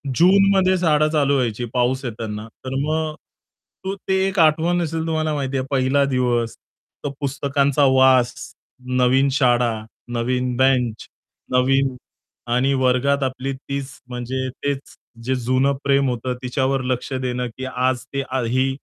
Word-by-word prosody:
जूनमध्ये 190 +1 +4
शाळा 155 -3 +3
चालू 145 -2 +2
व्हायची 120 -2 -1
पाऊस 130 +2 +1
येताना, 110 -2 -5 0.2
तर 130 +1 -3
मग 155 +1 -1 0.7
तो 195 +1 -3
ते 190 0 -2
एक 190 -1 -2
आठवण 165 +3 +3
असेल 160 0 -2
तुम्हाला 155 -1 0
माहिती 135 -1 -2
आहे 130 - -2
पहिला 135 +1 +2
दिवस 125 -3 0 0.5
तर - - 0
पुस्तकांचा 140 0 +1
वास, 130 -2 +5 0.7
नवीन 130 +2 +4
शाळा, 120 -3 +2 0.4
नवीन 125 +1 -1
बेंच 125 -4 +1 0.4
नवीन 135 +1 +2 0.6
आणि 130 +3 +2
वर्गात 130 +2 +2
आपली 130 +1 -2
तीच 135 0 -5 0.2
म्हणजे 125 +2 -3 0.2
तेच 140 -1 -3 0.3
जे 130 +2 0
जुनं 130 +3 +1
प्रेम 140 -1 +2
होतं 125 +1 -2
तिच्यावर 130 +1 0
लक्ष 125 +1 -2
देणं, 125 -1 -2
की 130 - -5
आज 130 0 -1
ते 140 0 -1 0.2
ही 130 +3 +1
130 Hz, 135 wpm, -21 LUFS, 125-140 Hz, 0.7 s, वास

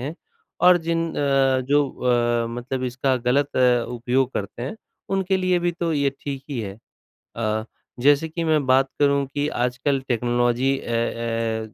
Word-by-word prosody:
हैं। 140 +6 -4 0.5
और 180 0 +7
जिन 165 0 +1
अ, 135 -2 +2
जो 145 0 +3
अ, 120 -1 +1
मतलब 130 +2 -4
इसका 130 +1 0
गलत 140 +2 +1 0.3
उपयोग 125 +2 0
करते 105 +4 -5
हैं 140 - -5 0.4
उनके 190 0 +1
लिए 185 -1 +1
भी 175 0 0
तो 170 -1 -2
ये 140 -2 +1
ठीक 140 -2 -5
ही 130 -4 -2
है। 100 -1 -6 0.6
अ, 110 -1 -1 0.4
जैसे 145 +4 +4
कि 170 +2 -3
मैं 155 -3 +2
बात 130 +1 +3
करूँ 140 -1 +3
कि 145 0 0 0.2
आजकल 130 +3 -1
टेक्नोलॉजी 120 +2 +1
अ - - -11
अ, 115 -1 -2
135 Hz, 160 wpm, -23 LUFS, 120-145 Hz, 0.6 s, और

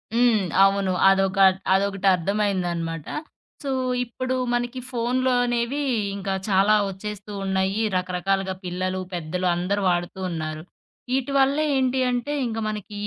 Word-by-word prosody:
హ్మ్. 235 -3 +4 0.2
అవును. 195 -1 +1 0.2
అదొక 195 +1 +2 0.4
అదొకటర్థమైందనమాట. 190 -4 0 0.6
సో 275 - -2 0.3
ఇప్పుడు 255 +2 -3 0.2
మనకి 245 +1 -1
ఫోనులో 250 +2 +1
అనేవి 240 +4 -1 0.3
ఇంకా 195 -1 -3 0.2
చాలా 200 +2 +4
ఒచ్చేస్తూ 205 +1 -7
ఉన్నాయి, 190 +2 0
రకరకాలుగా 190 +1 -1
పిల్లలు, 185 +1 -2
పెద్దలు 175 +2 -2
అందరూ 195 +4 -1
వాడుతూ 175 +2 -1
ఉన్నారు. 155 -1 -4 0.5
ఇటివల్లే 275 +3 +2
ఏంటి 260 0 +1
అంటే 245 +4 -2
ఇంక 225 -1 -4
మనకి 210 -1 -6
195 Hz, 110 wpm, -24 LUFS, 185-240 Hz, 0.6 s, హ్మ్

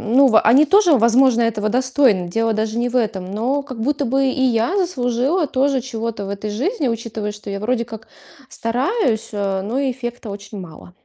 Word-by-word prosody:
ну, 275 0 +7
в 225 -4 +5
они 250 +7 +5
тоже, 370 -3 +5
возможно, 235 +1 +4
этого 215 -2 0
достойны. 250 -6 +2
Дело 225 +3 0
даже 220 +1 -2
не 240 +1 0
в 250 - -5
этом, 210 -6 -1
но 255 +7 -1
как 255 -5 -8
будто 285 +3 0
бы 270 +2 +1
и 260 0 0
я 235 - +1
заслужила 285 -2 0
тоже 270 -1 0
чего-то 230 -4 -5
в 195 - -6
этой 200 +1 -5
жизни, 290 - -1
учитывая, 225 -2 -4
что 210 0 -10
я 200 0 -4
вроде 235 +2 -1
как 220 -2 -10 0.4
стараюсь, 245 - -1
а, 195 -2 -1
но 215 +6 -3
эффекта 245 -4 -4
очень 200 +1 -8
мало. 175 0 -12
235 Hz, 190 wpm, -19 LUFS, 215-265 Hz, 0.4 s, ну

